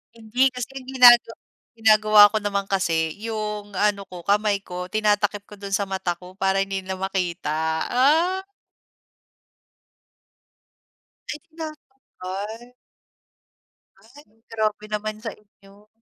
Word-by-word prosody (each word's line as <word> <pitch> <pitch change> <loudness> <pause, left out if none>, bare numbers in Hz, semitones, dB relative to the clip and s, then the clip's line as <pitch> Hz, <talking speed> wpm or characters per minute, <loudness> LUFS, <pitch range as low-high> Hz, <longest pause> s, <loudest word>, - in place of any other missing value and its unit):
Hindi, 235 +4 +1
kasi 250 -1 -5
ang 260 -1 -8
ginagaw 240 -3 +7 0.4
ginagawa 215 -2 +6
ko 215 +1 -2
naman 200 -1 -2
kasi 165 -5 0
'yung 210 -1 -5
ano 205 -1 +1
ko, 175 -1 -10
kamay 205 0 +2
ko 180 -1 -8
tinatakip 205 -1 0
ko 210 - -12
do'n 200 -1 -9
sa 195 0 0
mata 185 -3 -3
ko 180 +1 -13
para 195 0 +1
hindi 195 -1 -2
nila 190 0 -5
makita, 185 -5 -2 0.4
ah. 325 +9 +2 2.9
Ay 300 - -4
tinatanggal. 250 - -9 1.3
Ay, 250 +8 -17 0.2
grabe 215 -1 -2
naman 215 0 -4
sa 225 0 -5
inyo. 200 0 -22
210 Hz, 115 wpm, -23 LUFS, 195-230 Hz, 2.9 s, ginagaw